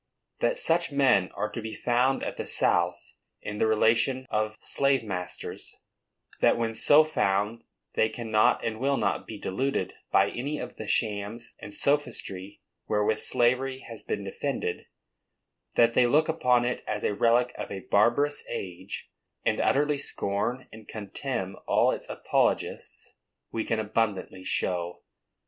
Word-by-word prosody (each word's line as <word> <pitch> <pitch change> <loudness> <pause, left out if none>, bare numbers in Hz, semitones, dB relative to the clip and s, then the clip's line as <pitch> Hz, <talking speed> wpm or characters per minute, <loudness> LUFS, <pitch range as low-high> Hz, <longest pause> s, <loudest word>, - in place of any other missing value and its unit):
That - - +1
such 170 0 +1
men 130 -10 +3
are 105 - -2
to 115 - -5
be 110 0 -6
found 125 +2 +1
at - - -3
the - - -4
South 85 0 +1 0.3
in 105 0 -6
the 110 - +3
relation 115 +4 +3
of 110 0 -1
slave 140 -3 +1
masters, 90 -4 -5 0.6
that - - +4
when 115 -1 -1
so 145 +7 +6
found 105 -6 0 0.3
they 110 - +2
cannot 110 -2 +2
and 110 -1 -2
will 140 +2 +1
not - - -1
be 110 - -7
deluded 100 -1 -2 0.2
by - - +4
any 140 +5 -3
of - - -7
the - - -6
shams 110 +1 -1
and - - -8
sophistry 105 -8 -1 0.2
wherewith 105 0 +1
slavery 130 +2 +2
has 115 -2 -9
been 100 - -3
defended, 100 -1 -3 0.9
that 115 0 +5
they 125 0 +4
look 150 +5 +3
upon 125 -6 +2
it 125 - -2
as 105 -1 -2
a - - +1
relic 120 +3 +3
of - - -5
a 95 - -5
barbarous 120 +10 +2
age, 95 +1 -6 0.3
and - - +2
utterly 145 +1 +2
scorn 120 0 -1
and 110 -1 -12
contemn 100 -1 -4
all - - +4
its - - -6
apologists, - - -1 0.4
we 115 - -1
can 115 - -1
abundantly 105 -3 -1
show. 90 -1 -1
115 Hz, 150 wpm, -27 LUFS, 100-130 Hz, 0.9 s, so